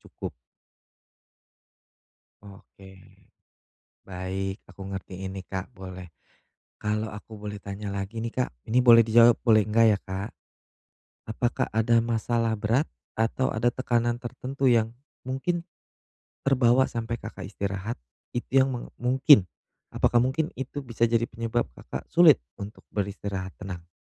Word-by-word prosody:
cukup. -, -, -8 dB, 2.1 s
Oke, 95 Hz, -1 st, -15 dB, 1.1 s
baik. 95 Hz, +2 st, -4 dB
Aku -, -, -17 dB
ngertiin 95 Hz, 0 st, -6 dB
nih, 95 Hz, -, -6 dB
Kak, 95 Hz, 0 st, -4 dB
boleh. 95 Hz, -1 st, -8 dB, 0.7 s
Kalau 105 Hz, +1 st, -1 dB
aku 105 Hz, +1 st, -10 dB
boleh 105 Hz, 0 st, -5 dB
tanya 100 Hz, 0 st, -6 dB
lagi 100 Hz, +3 st, -4 dB
nih, 115 Hz, 0 st, -3 dB
Kak 125 Hz, -, 0 dB, 0.2 s
ini 125 Hz, +3 st, +4 dB
boleh 115 Hz, -2 st, +8 dB
dijawab, 115 Hz, +1 st, +6 dB
boleh 110 Hz, -4 st, +5 dB
enggak 115 Hz, +1 st, +4 dB
ya, -, -, -10 dB
Kak. 95 Hz, +2 st, -5 dB, 1.0 s
Apakah 120 Hz, +2 st, 0 dB
ada 115 Hz, +1 st, +3 dB
masalah 115 Hz, 0 st, 0 dB
berat 115 Hz, +8 st, +1 dB, 0.3 s
atau 115 Hz, +4 st, +1 dB
ada 115 Hz, +3 st, +2 dB
tekanan 120 Hz, -2 st, 0 dB
tertentu 130 Hz, +2 st, -1 dB
yang 115 Hz, -1 st, +3 dB, 0.3 s
mungkin 170 Hz, +7 st, -2 dB, 0.8 s
terbawa 130 Hz, -1 st, +4 dB
sampai 115 Hz, 0 st, -3 dB
Kakak -, -, -7 dB
istirahat? 100 Hz, +3 st, -4 dB, 0.3 s
Itu 130 Hz, +2 st, +2 dB
yang 135 Hz, -, +1 dB
meng 120 Hz, -, -6 dB
mungkin, 130 Hz, -2 st, +6 dB, 0.5 s
apakah 120 Hz, -, +3 dB
mungkin 150 Hz, +6 st, 0 dB
itu 135 Hz, +2 st, -5 dB
bisa 115 Hz, -1 st, 0 dB
jadi 115 Hz, 0 st, +2 dB
penyebab 115 Hz, +1 st, -1 dB
Kakak -, -, -7 dB
sulit 165 Hz, -4 st, +7 dB, 0.2 s
untuk 100 Hz, +2 st, -8 dB
beristirahat 100 Hz, -2 st, -3 dB
tenang? 90 Hz, -3 st, -7 dB
115 Hz, 125 wpm, -27 LUFS, 100-120 Hz, 2.1 s, boleh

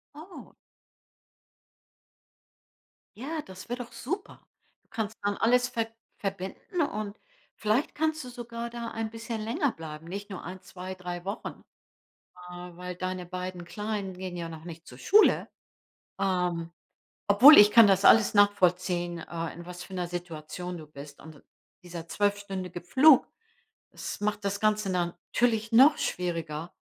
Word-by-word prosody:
Oh. 325 Hz, +6 st, -12 dB, 2.6 s
Ja, 300 Hz, +7 st, -4 dB
das 190 Hz, -6 st, -12 dB
wäre 245 Hz, +1 st, -3 dB
doch 235 Hz, -, -18 dB
super. 320 Hz, -, -6 dB, 0.4 s
Du -, -, -39 dB
kannst 220 Hz, -1 st, -4 dB
dann 205 Hz, 0 st, 0 dB
alles 245 Hz, +2 st, +3 dB
ver 230 Hz, -2 st, -1 dB, 0.3 s
verbinden, 195 Hz, -, -4 dB
und 215 Hz, -8 st, -2 dB, 0.4 s
vielleicht 215 Hz, +6 st, 0 dB
kannst 315 Hz, 0 st, 0 dB
du -, -, -8 dB
sogar 235 Hz, -1 st, -6 dB
da 235 Hz, -1 st, -5 dB
ein 220 Hz, -1 st, -3 dB
bisschen 230 Hz, 0 st, -5 dB
länger 275 Hz, -, 0 dB
bleiben, 160 Hz, -1 st, -9 dB
nicht 200 Hz, +4 st, -6 dB
nur 190 Hz, -, -6 dB
1, 185 Hz, +2 st, -7 dB
2, 185 Hz, 0 st, -8 dB
3 180 Hz, -1 st, -6 dB
Wochen, 200 Hz, +4 st, -6 dB, 0.9 s
äh, -, -, -9 dB, 0.2 s
weil 180 Hz, 0 st, -6 dB
deine 185 Hz, 0 st, -4 dB
beiden 180 Hz, 0 st, -5 dB
Kleinen 205 Hz, +1 st, -4 dB
gehen 180 Hz, -1 st, -6 dB
ja 170 Hz, -1 st, -5 dB
noch 160 Hz, 0 st, -10 dB
nicht 165 Hz, -1 st, -9 dB
zur 125 Hz, -, -12 dB
Schule. 420 Hz, -, +4 dB, 0.7 s
Ähm, 180 Hz, -3 st, 0 dB, 0.6 s
obwohl 255 Hz, +10 st, +10 dB
ich 210 Hz, 0 st, +9 dB
kann 230 Hz, -3 st, +8 dB
das 195 Hz, 0 st, +3 dB
alles 220 Hz, -2 st, +7 dB
nachvollziehen, 180 Hz, -3 st, +2 dB
äh, 165 Hz, -1 st, -5 dB
in 170 Hz, +1 st, -10 dB
was 180 Hz, 0 st, -8 dB
für 190 Hz, -, -12 dB
'ner 180 Hz, -1 st, -2 dB
Situation 175 Hz, 0 st, -6 dB
du 155 Hz, -, -10 dB
bist. 145 Hz, -1 st, -12 dB
Und 155 Hz, -2 st, -13 dB, 0.4 s
dieser 170 Hz, -2 st, -8 dB
zwölfstündige 195 Hz, -3 st, -2 dB
Flug, 270 Hz, -, +6 dB, 0.7 s
das -, -, -6 dB
macht 210 Hz, 0 st, -1 dB
das 200 Hz, 0 st, -1 dB
Ganze 215 Hz, -2 st, +1 dB
natürlich 215 Hz, +6 st, 0 dB
noch 275 Hz, +6 st, +7 dB
schwieriger. 165 Hz, -2 st, -3 dB
195 Hz, 145 wpm, -28 LUFS, 175-225 Hz, 2.6 s, obwohl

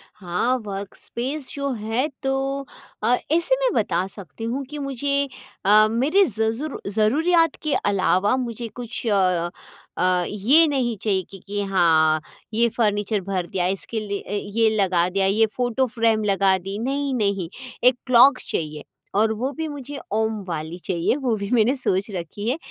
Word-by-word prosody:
हाँ, 210 Hz, +6 st, 0 dB
work 200 Hz, -1 st, -6 dB
space 265 Hz, +4 st, -4 dB
जो 280 Hz, -1 st, -2 dB
है, 225 Hz, +4 st, -1 dB, 0.2 s
तो 270 Hz, +1 st, -1 dB, 0.4 s
अ, 245 Hz, -, +4 dB, 0.2 s
ऐसे 340 Hz, +10 st, +3 dB
में -, -, +2 dB
बता 185 Hz, -4 st, +1 dB
सकती 200 Hz, +3 st, -10 dB
हूँ 250 Hz, +5 st, -2 dB
कि 300 Hz, -, -6 dB
मुझे 280 Hz, +1 st, -1 dB, 0.4 s
अ, 215 Hz, +2 st, +6 dB
मेरे 290 Hz, -, +3 dB
ज़ 220 Hz, -, -3 dB, 0.2 s
ज़रू 300 Hz, +1 st, -5 dB
ज़रूरियत 315 Hz, -, +3 dB
के 305 Hz, -2 st, 0 dB
अलावा 200 Hz, +2 st, +2 dB
मुझे 235 Hz, -2 st, -4 dB
कुछ 240 Hz, 0 st, -5 dB
अ, 185 Hz, -4 st, +2 dB, 0.8 s
ये 245 Hz, +11 st, +5 dB
नहीं 255 Hz, -5 st, 0 dB
चाहिए 195 Hz, -3 st, +1 dB
कि 195 Hz, -, -10 dB
कि 205 Hz, 0 st, -2 dB
हाँ, 160 Hz, -5 st, +3 dB, 0.3 s
ये 235 Hz, +2 st, +3 dB
फर्नीचर 210 Hz, -2 st, +1 dB
भर 185 Hz, -2 st, -2 dB
दिया। 180 Hz, -1 st, -1 dB
इसके 195 Hz, +4 st, -3 dB
लिए 200 Hz, -1 st, -3 dB
अ, -, -, -10 dB, 0.3 s
ये 225 Hz, -1 st, +5 dB
लगा 185 Hz, -4 st, +2 dB
दिया, 195 Hz, +1 st, +1 dB
ये 210 Hz, +3 st, +4 dB
फ़ोटो 250 Hz, +1 st, +1 dB
फ्रेम 225 Hz, -2 st, +1 dB
लगा 195 Hz, -2 st, +3 dB
दी। 195 Hz, +2 st, -6 dB
नहीं, 275 Hz, +3 st, -1 dB
नहीं, 200 Hz, -7 st, 0 dB, 0.3 s
एक 250 Hz, 0 st, +6 dB
क्लॉक 255 Hz, +2 st, +7 dB
चाहिए 150 Hz, -2 st, -3 dB, 0.3 s
और 220 Hz, +2 st, +3 dB
वो 250 Hz, +5 st, -2 dB
भी 320 Hz, 0 st, -2 dB
मुझे 285 Hz, -1 st, -7 dB, 0.2 s
ओम 220 Hz, -1 st, 0 dB
वाली 160 Hz, 0 st, -4 dB
चाहिए। 175 Hz, +3 st, +1 dB
वो 260 Hz, -5 st, 0 dB
भी 200 Hz, 0 st, -4 dB
मैंने 245 Hz, +2 st, +3 dB
सोच 195 Hz, -6 st, 0 dB
रखी 195 Hz, +5 st, -4 dB
है 265 Hz, -, 0 dB
220 Hz, 165 wpm, -23 LUFS, 195-265 Hz, 0.8 s, क्लॉक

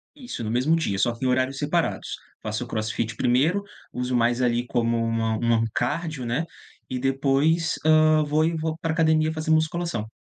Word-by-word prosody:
Isso, 250 Hz, -, -7 dB
no 110 Hz, -, -3 dB
mesmo 130 Hz, +7 st, +2 dB
dia, 160 Hz, -12 st, -1 dB
só 120 Hz, +4 st, +2 dB
que 115 Hz, -, -9 dB
em -, -, +2 dB
horários 130 Hz, +2 st, +1 dB
separados. 155 Hz, +3 st, -1 dB, 0.3 s
Faço 110 Hz, +3 st, -3 dB
CrossFit 110 Hz, 0 st, -2 dB
primeiro, 150 Hz, +14 st, +2 dB, 0.3 s
uso 125 Hz, 0 st, -3 dB
mais 120 Hz, +1 st, +2 dB
ali 120 Hz, 0 st, +1 dB
como 115 Hz, -1 st, 0 dB
uma 115 Hz, -1 st, 0 dB
um 115 Hz, -1 st, +2 dB
cardio, 155 Hz, -4 st, -2 dB
né? 120 Hz, +8 st, -1 dB, 0.5 s
E 125 Hz, -, -3 dB
depois, 140 Hz, +5 st, +1 dB
hã, 155 Hz, 0 st, +5 dB
vou 150 Hz, +2 st, +1 dB
e 165 Hz, +1 st, +1 dB
vou 160 Hz, 0 st, -2 dB
pra 165 Hz, -1 st, -2 dB
a -, -, -1 dB
academia 160 Hz, -1 st, +2 dB
fazer 155 Hz, 0 st, -2 dB
musculação. 160 Hz, -7 st, 0 dB
135 Hz, 180 wpm, -24 LUFS, 120-160 Hz, 0.5 s, hã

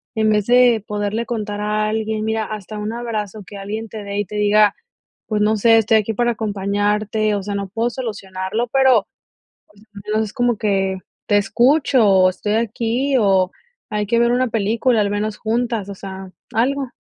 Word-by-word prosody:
en 220 Hz, -1 st, +2 dB
vez 210 Hz, 0 st, +1 dB
de 245 Hz, -3 st, +4 dB
poderle 210 Hz, +2 st, -2 dB
contar 210 Hz, -3 st, -3 dB
a 210 Hz, 0 st, 0 dB
alguien, 220 Hz, 0 st, -2 dB
mira, 220 Hz, 0 st, -1 dB
hasta 215 Hz, 0 st, -7 dB
un 210 Hz, +1 st, -3 dB
abrazo 215 Hz, -3 st, -4 dB
que 205 Hz, -, -10 dB
alguien 215 Hz, +3 st, -5 dB
te 215 Hz, -1 st, -7 dB
dé 200 Hz, 0 st, -5 dB
y 205 Hz, -, -1 dB
te 210 Hz, +3 st, -9 dB
diga: 210 Hz, 0 st, +4 dB, 0.5 s
"Pues 210 Hz, -1 st, -1 dB
no 215 Hz, +1 st, +2 dB
sé, 225 Hz, +2 st, +5 dB
estoy 220 Hz, 0 st, +4 dB
aquí 215 Hz, +1 st, -1 dB
para 240 Hz, +2 st, +1 dB
acompañarte, 210 Hz, 0 st, -1 dB
o 200 Hz, -, -3 dB
sea, 205 Hz, 0 st, -4 dB
no 200 Hz, -1 st, -3 dB
puedo 230 Hz, +3 st, -1 dB
solucionarlo, 205 Hz, -2 st, -4 dB
pero, 260 Hz, -6 st, +4 dB, 0.9 s
al 200 Hz, -, -9 dB
menos 220 Hz, 0 st, +1 dB
es 205 Hz, -, -10 dB
como 245 Hz, -4 st, +1 dB
que 195 Hz, -2 st, 0 dB, 0.3 s
te 205 Hz, -, +3 dB
escucho 255 Hz, +3 st, +3 dB
o 190 Hz, -2 st, +5 dB
estoy 210 Hz, +3 st, -3 dB
aquí 235 Hz, +4 st, 0 dB
o 190 Hz, -4 st, +3 dB, 0.4 s
hay 210 Hz, -1 st, -1 dB
que 235 Hz, +2 st, +1 dB
ver 235 Hz, 0 st, +3 dB
una 255 Hz, 0 st, +1 dB
película 225 Hz, +2 st, +1 dB
al 200 Hz, -1 st, +1 dB
menos 210 Hz, +1 st, -2 dB
juntas", 230 Hz, -2 st, -1 dB
o 200 Hz, -, -6 dB
sea, 190 Hz, -1 st, -8 dB, 0.2 s
algo. 265 Hz, +2 st, 0 dB
215 Hz, 185 wpm, -20 LUFS, 205-230 Hz, 0.9 s, sé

